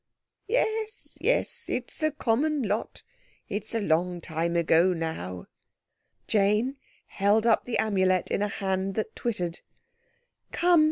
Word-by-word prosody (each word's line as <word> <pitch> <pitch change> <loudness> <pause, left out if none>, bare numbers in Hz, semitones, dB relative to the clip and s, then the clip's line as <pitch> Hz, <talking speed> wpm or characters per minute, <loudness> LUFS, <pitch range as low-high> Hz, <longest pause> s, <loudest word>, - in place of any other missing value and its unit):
_" - - -59 0.4
"Yes, 440 -1 -1
yes, - - +1
it's - - -4
the 310 -1 +2
common 290 +1 0
lot. 210 0 -2 0.4
It's 215 +3 -4
a - - +2
long 175 -1 +1
time 165 +1 -2
ago 170 +2 +4
now." 90 - -4 0.8
Jane 210 +6 +2 0.3
held 205 +3 +2
up 230 -2 +3
the 245 - -1
Amulet 190 -4 +2
in - - +1
a 205 - +2
hand 190 -1 -2
that 220 0 -3
twittered. 180 -8 -2 0.9
"Come!" 350 -1 +4
205 Hz, 130 wpm, -27 LUFS, 175-235 Hz, 0.9 s, ago